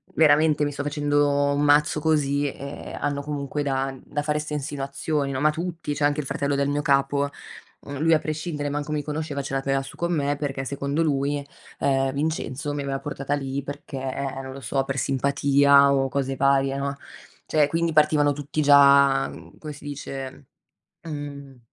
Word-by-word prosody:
Veramente 155 -1 +4
mi 145 - 0
sto 140 0 -5
facendo 145 -1 +1
un 145 - 0
mazzo 150 +1 +4
così 145 -2 +1
e 140 +1 -8
hanno 145 0 -1
comunque 145 0 -3
da 135 -1 -1
da 145 0 -3
fare 150 0 0
ste 150 0 -4
insinuazioni 140 +1 -2
no", 130 - -2
ma 150 +2 +3
tutti, 165 -1 -4
cioè 145 - -3
anche 145 +1 +2
il 150 - -3
fratello 140 +1 -1
del 140 0 +1
mio 145 +1 0
capo, 140 0 +2 0.5
uhm, 140 -1 -7
lui 165 +1 +4
a 155 - +4
prescindere, 150 -1 -3
manco 145 +1 -3
mi 150 -1 0
conosceva 150 -1 -3
ce 135 - -6
l'aveva 135 0 0
su 135 - -10
con 170 0 -1
me 145 -2 0
perché 135 -2 -3
secondo 140 +3 -2
lui, 145 -1 0 0.4
ehm, 135 -1 +1
Vincenzo 145 -1 -2
mi 145 - -3
aveva 135 -1 -2
portata 145 -1 -4
lì 135 -1 -2
perché, 145 0 -7 0.5
non 130 0 -7
lo 135 - -8
so, 135 +3 -1
per 135 0 -4
simpatia 140 +1 +4
o 135 -1 +2
cose 135 0 -1
varie, 135 0 +2
no. 140 0 -2 0.5
Cioè, 150 -2 +3
quindi 165 +2 0
partivano 150 -1 +4
tutti 145 +2 -3
già, 140 -1 +6
mhmm, - - -12
come 155 -1 -7
si 140 - -14
dice, 135 -1 -7 0.6
uhm, 140 -4 -7
145 Hz, 180 wpm, -24 LUFS, 140-150 Hz, 0.6 s, già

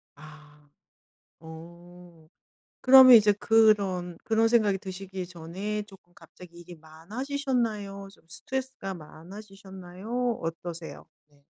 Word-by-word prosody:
아. 150 0 -17 0.7
어 170 +1 -14 0.5
그러면 260 -1 +8
이제 210 -2 +4
그런 200 -5 +1
그런 225 0 +2
생각이 215 -4 +2
드시기 190 -1 -8
전에 185 +5 -6
쪼금 195 -4 -19
갑자기 175 -1 -16
일이 175 0 -13
많아지셨나요? 210 - -4
좀 - - -24
스트레스가 260 -1 -6
많아지셨나요? 195 +6 -7
어떠세요? 165 -2 -7 0.2
네. 145 -1 -29
190 Hz, 255 characters per minute, -26 LUFS, 170-215 Hz, 0.7 s, 그러면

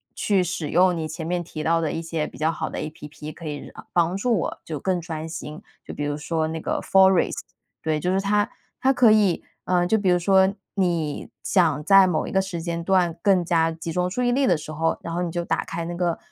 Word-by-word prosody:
去 195 -3 +2
使 170 -4 -3
用 180 0 +3
你 160 - -3
前 160 +1 -6
面 175 0 -1
提 155 -2 -7
到 165 +2 +2
的 160 - -1
一 165 - -3
些 165 -2 -2
比 - - -11
较 160 +1 +2
好 165 - -4
的 - - -5
APP， 150 0 -7
可 170 - -11
以 145 -1 -6 0.2
帮 175 +1 +2
助 230 0 +1
我 - - -3
就 155 -3 -5
更 185 +1 0
专 160 -1 -6
心。 155 -1 -7 0.2
就 - - -7
比 145 - -4
如 145 0 -2
说 160 +1 -1
那 160 0 -4
个 - - -2
FOREST， 190 -1 +4 0.4
对， 155 -1 0
就 180 +4 0
是 190 - +2
它 205 +1 +1 0.3
它 265 +1 +3
可 245 -4 +5
以， 205 -5 +3 0.2
啊， 180 -1 +2
就 220 +5 +2
比 195 -3 +1
如 180 - +4
说 190 +2 +4 0.2
你 170 -6 -1
想 160 -6 +2
在 195 +2 +7
某 160 -4 0
一 - - -5
个 190 - +3
时 190 -3 -5
间 170 0 -3
段 180 -3 +2
更 190 -3 +3
加 165 -1 +2
集 165 +1 -6
中 180 +2 0
注 250 +6 -2
意 245 - +2
力 270 +2 +2
的 175 - +4
时 155 0 -8
候， 165 +1 0
然 165 - -5
后 175 - -1
你 170 - -3
就 175 0 -2
打 - - 0
开 170 0 -4
那 175 - -4
个， 175 -1 0
170 Hz, 285 characters per minute, -24 LUFS, 160-190 Hz, 0.4 s, 在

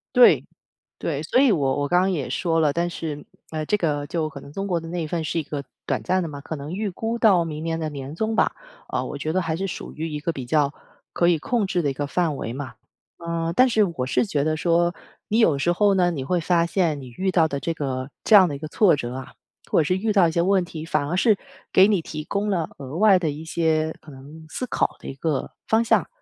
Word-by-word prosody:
对， 250 -1 +7 0.5
对， - - -2
所 - - +2
以 270 -3 +5
我 145 -6 +1
我 145 - 0
刚 175 +3 +3
刚 190 +1 +1
也 150 -8 -2
说 165 -2 0
了。 150 -3 +3
但 170 +2 0
是 155 -3 -5 0.3
呃， 155 -1 -2
这 210 - +2
个 145 -6 -1
就 160 -1 -1
可 145 -3 -9
能 140 - -12
中 195 +6 -4
国 180 -4 0
的 165 - -9
那 175 0 -2
一 - - -3
份 165 +1 -2
是 160 +2 -1
一 160 - -2
个 140 -1 -5 0.2
短 - - -1
暂 185 0 +1
的 - - -3
嘛， 145 -2 -7
可 160 - -5
能 145 +3 -7
预 205 +2 -2
估 225 +5 -3
到 190 -7 +5
明 155 -1 -5
年 165 0 -2
的 160 -1 -2
年 140 0 -7
终 220 +5 -1
吧， - - +2 0.3
啊， - - -2
我 - - -5
觉 155 +2 -2
得 185 - +1
还 165 -2 -2
是 195 +4 -2
属 180 - -7
于 160 +1 -4
一 150 -1 -4
个 165 +3 -2
比 130 - -5
较 145 +1 +2 0.4
可 170 - +2
以 175 -2 +4
控 220 +5 0
制 180 -2 0
的 145 - +1
一 - - -5
个 145 +2 -3
范 165 -1 0
围 115 - -4
嘛。 135 0 -6 0.5
呃， 170 -1 -2
但 255 +4 +5
是 220 -3 +3
我 165 -10 -2
是 185 - +2
觉 145 -9 0
得 155 0 0
说 170 +1 +2 0.3
你 220 - +1
有 160 -12 +4
时 175 - +2
候 200 +3 +3
呢， 180 -2 +3
你 150 -6 -3
会 175 +6 0
发 170 0 +2
现 170 -4 0
你 130 - -9
遇 190 +1 0
到 170 -3 +3
的 140 -2 -3
这 155 +5 -2
个 130 -3 -3
这 220 - +6
样 185 -4 +8
的 145 - -4
一 - - -5
个 155 - -5
挫 180 +2 +4
折 120 -4 -4
啊， 130 0 -8 0.4
或 - - +4
者 - - +4
是 180 +5 +1
遇 215 +4 0
到 195 -4 +5
一 165 - -1
些 170 - +1
问 190 0 +2
题， 160 -2 -7
反 155 -3 0
而 170 - -1
是 210 +2 +4 0.3
给 190 +2 +7
你 200 -5 +2
提 155 -1 -6
供 200 +5 -2
了 170 -5 0
额 135 +1 -7
外 200 -1 +6
的 165 -3 -1
一 150 +2 -6
些 160 -1 0
可 155 - -13
能 145 +4 -12
思 255 - -4
考 - - 0
的 - - -11
一 - - -4
个 140 0 -2 0.2
方 225 +1 +3
向。 - - +3
165 Hz, 290 characters per minute, -23 LUFS, 150-185 Hz, 0.5 s, 样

